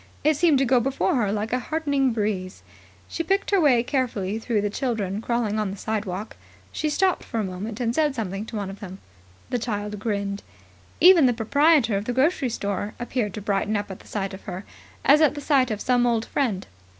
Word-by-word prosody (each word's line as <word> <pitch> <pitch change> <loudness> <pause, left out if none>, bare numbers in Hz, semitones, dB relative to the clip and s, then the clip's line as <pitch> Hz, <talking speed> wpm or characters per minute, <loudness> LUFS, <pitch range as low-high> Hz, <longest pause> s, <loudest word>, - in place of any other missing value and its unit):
It 310 +1 +4
seemed 315 -1 +4
to 270 - +2
go 255 0 +4
before 270 +3 0
her 210 -5 +1
like 215 +2 -2
a 250 - +2
heartening 285 -1 0
breeze. 205 -4 -3 0.4
She - - -3
picked 390 +5 0
her 395 -3 +4
way 255 -6 +4
carefully 230 -7 -1
through 225 -2 0
the 205 - -1
children 210 -5 -2
crawling 230 -3 -1
on 210 -2 -1
the 195 - -6
side 215 +1 -2
walk. 195 +3 -6 0.3
She 310 - -1
stopped 370 +5 +1
for 230 - -4
a - - 0
moment 200 +4 -5
and 235 -2 0
said 300 0 +1
something 200 -3 -3
to 225 - -7
one 200 -2 -3
of 195 - -11
them. 190 -2 -8 0.5
The 245 - 0
child 210 -3 -3
grinned. 200 -2 -2 0.6
Even 350 -6 +7
the 245 - +3
proprietor 260 0 +3
of 200 - -4
the 245 - -2
grocery 265 0 +2
store 205 -1 -3
appeared 240 -4 -2
to 210 - -5
brighten 205 +1 0
up 205 -1 -4
at 190 - -8
the - - -17
sight 195 -2 -3
of 190 - -10
her, 190 +1 -6 0.4
as 295 +3 +6
at 300 -1 +4
the - - -4
sight 270 -3 +3
of 215 -2 -2
some 245 -1 +2
old 230 -1 +1
friend. 220 -9 -1
225 Hz, 220 wpm, -24 LUFS, 205-270 Hz, 0.6 s, Even